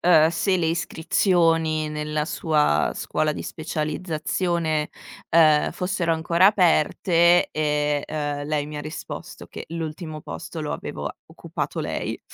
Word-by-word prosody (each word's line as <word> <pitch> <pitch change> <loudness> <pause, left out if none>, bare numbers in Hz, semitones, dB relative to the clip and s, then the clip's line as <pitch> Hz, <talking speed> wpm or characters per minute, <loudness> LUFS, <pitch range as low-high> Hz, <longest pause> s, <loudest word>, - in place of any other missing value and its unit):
ehm, 160 -3 +6
se 185 +3 +1
le 165 -2 0
iscrizioni 165 -1 +1
nella 150 0 -2
sua 150 - +1
scuola 155 0 -1
di - - -5
specializzazione, 160 0 -2 0.4
ehm, 155 -2 +5
fossero 180 -2 -1
ancora 170 +3 +3
aperte 175 -2 +4
e, 150 -1 0
ehm, 145 -1 -3
lei 150 -1 0
mi 150 - -7
ha 150 - -3
risposto 155 +2 -8
che - - -8
l'ultimo 160 -1 -5
posto 160 +1 -7
lo 150 - -3
avevo - - -5 0.2
occupato - - -5
lei. - - -3
160 Hz, 125 wpm, -24 LUFS, 150-170 Hz, 0.4 s, ehm